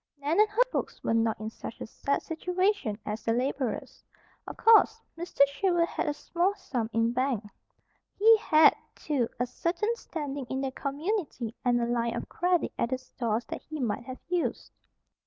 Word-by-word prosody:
Nan 295 +6 0
and 425 0 +6
her 440 +4 +4
folks - - -3
were - - +1
not 225 -1 +1
in 215 +1 -5
such 225 - -8
a - - -5
sad 280 +5 -2
situation 360 - 0
as 210 +1 -3
the 225 - +1
laborers, 255 0 -2 0.4
of - - -7
course. 445 0 +6 0.2
Mr. 335 -3 -4
Sherwood 340 +4 +1
had - - -3
a 295 - +1
small 355 +6 0
sum 240 - -3
in 230 +1 +2
bank. 255 -3 0 0.7
He 450 +3 +7
had, 315 -7 +6 0.2
too, 270 -7 -1
a 245 - +2
certain 355 - -1
standing 285 - -5
in 265 0 -2
the 270 -1 -2
community 280 - -3
and 245 -1 +3
a 235 - +1
line 235 -1 0
of - - -4
credit 355 0 +1
at 235 - +1
the 260 - 0
stores 240 -3 -3
that - - -5
he 310 -1 -7
might 235 -2 -2
have 255 0 -7
used. 350 0 -2
280 Hz, 180 wpm, -28 LUFS, 235-350 Hz, 0.7 s, He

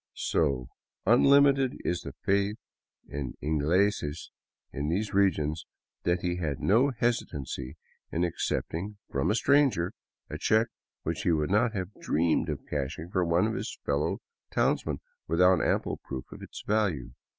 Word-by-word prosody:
So 70 -6 0 0.4
unlimited 135 +3 +5
is 90 - 0
the - - -7
faith 100 +2 +1 0.5
in 70 -3 -5
" - - -58
ingleses 80 +1 +1 0.2
" - - -58
in 70 +2 -2
these 100 +5 -1
regions 80 -6 +1 0.4
that 85 0 +2
he 90 -1 -1
had 75 -6 -2
no 120 +8 +4
hesitancy 80 - -2 0.3
in 85 - 0
accepting 90 +3 -2
from 70 - +1
a 105 - +3
stranger 120 -10 +3 0.3
a - - -6
check 110 +2 +3 0.3
which - - -2
he - - +2
would 75 +1 +1
not 110 +3 +3
have 95 -1 -4
dreamed 80 +1 +1
of 70 -3 -4
cashing 75 +4 -4
for 95 -2 +2
one 85 +3 +3
of 110 - 0
his - - -4
fellow 70 +1 0 0.3
townsmen - - 0 0.3
without 90 +2 +4
ample - - 0
proof 65 -2 -7
of - - -10
its - - -9
value. 100 - 0
90 Hz, 150 wpm, -29 LUFS, 75-105 Hz, 0.5 s, unlimited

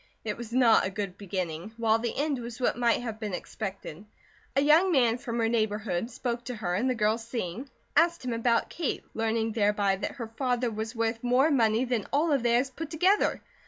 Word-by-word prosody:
It 210 - -2
was 235 -1 -8
not 240 -2 +5
a - - -1
good 195 -2 -4
beginning, 185 -1 -4
while 225 -1 +2
the 235 0 -3
end 290 -2 0
was 235 0 -7
what 250 - +1
might 240 0 +1
have 225 -2 -5
been 210 -4 -3
expected. 195 -3 -6 0.5
A 275 - +4
young 315 +6 +5
man 245 -6 +3
from 235 -1 -4
her 225 -1 +2
neighbourhood 215 -3 -1
spoke 240 -1 -3
to 250 - -4
her 190 -5 -3
and 230 +8 +1
the 255 - +1
girls 220 +1 +1
seeing, 230 +2 -5 0.3
asked 335 -1 +3
him 245 - -1
about 230 0 +1
Kate, 330 -6 -2
learning 225 0 0
thereby 205 -2 +2
that - - -4
her 230 -5 -6
father 245 -2 0
was 220 +2 -5
worth 225 0 -1
more 255 +5 +3
money 230 -2 +3
than 240 -5 -1
all 305 +3 +2
of 280 -3 +2
theirs 240 +3 +2
put 305 +4 -6
together. 370 +6 +2
230 Hz, 205 wpm, -28 LUFS, 215-255 Hz, 0.5 s, not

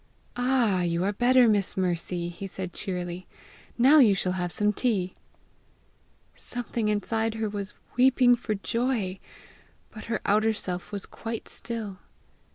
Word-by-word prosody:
"All, 245 -7 +2
you 170 0 0
are 200 +2 0
better, 245 +3 +5
Miss 205 -4 +1
Mercy!" 175 -1 -2
lie 195 - -3
said 185 -1 -6
cheerily. 180 -1 -4 0.5
"Now 270 +6 +7
you 220 -7 +6
shall 185 -1 -1
have 180 -1 -2
some 210 +2 +2
tea!" 195 -5 0 1.2
Something 240 -2 -3
inside 220 +2 -1
her 220 -1 -1
was 205 -1 -5 0.2
weeping 250 -1 +5
for 225 -3 -3
joy, 225 -3 -1 0.7
but 215 - -10
her 230 - -2
outer 215 +2 +3
self 180 -3 -2
was 200 -2 -4
quite 225 -1 -6
still. 215 -5 -6
210 Hz, 140 wpm, -27 LUFS, 185-235 Hz, 1.2 s, Now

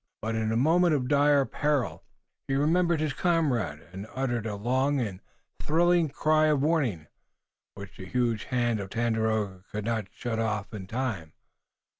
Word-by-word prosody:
But 110 +1 -1
in 110 -1 -1
the 110 - +1
moment 165 +5 +4
of 125 -3 -1
dire 145 -1 +4
peril 150 -3 -1 0.4
he 135 - 0
remembered 170 +3 +2
his 155 -2 -1
comrade 135 - 0
and 95 +3 -7
uttered 120 -4 -1
a 105 - -3
long 130 +6 +1
and 100 -7 -3 0.4
thrilling 170 +1 +3
cry 155 +2 +2
of 145 -3 +2
warning, 135 - +1 0.7
which 100 -1 -10
the 95 - -8
huge 120 -1 0
hand 120 -3 0
of 95 -1 -5
Tandakora 110 -4 -1
could 105 0 -4
not 110 -3 -1
shut 115 -2 -4
off 110 -1 -2
in 95 -3 -7
time. 110 -9 -3
120 Hz, 160 wpm, -28 LUFS, 110-150 Hz, 0.7 s, moment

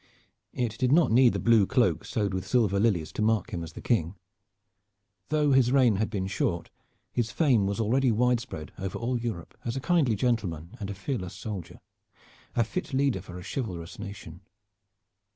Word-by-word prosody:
It 120 -3 -2
did 130 0 +2
not 160 -2 +5
need 125 +1 +6
the - - -1
blue 115 -4 +4
cloak 125 -2 +2
sewed 105 -3 -1
with 95 0 -3
silver 105 -5 +2
lilies 100 -8 +1
to - - -4
mark 110 -3 +1
him 85 - -2
as 80 -1 -9
the - - -9
King. 100 -7 +1 1.1
Though 150 -2 +2
his 130 -2 +4
reign 125 -7 +4
had 110 +2 0
been 100 -4 -2
short, 85 -3 -2 0.4
his 120 -2 -1
fame 125 -11 +3
was 100 +2 -2
already 125 +4 +2
widespread 115 -8 0
over 95 -1 -3
all 120 +1 -1
Europe 110 -8 -5
as 115 - -3
a - - -1
kindly 140 -5 +2
gentleman 100 -8 -1
and 100 -2 -5
a 100 - -4
fearless 95 -4 -4
soldier 100 -6 -7 0.8
a 120 - +4
fit 150 - -5
leader 135 -8 +1
for 90 -1 -10
a 90 - -8
chivalrous 90 -10 -5
nation. 95 -3 -8
110 Hz, 180 wpm, -28 LUFS, 95-125 Hz, 1.1 s, need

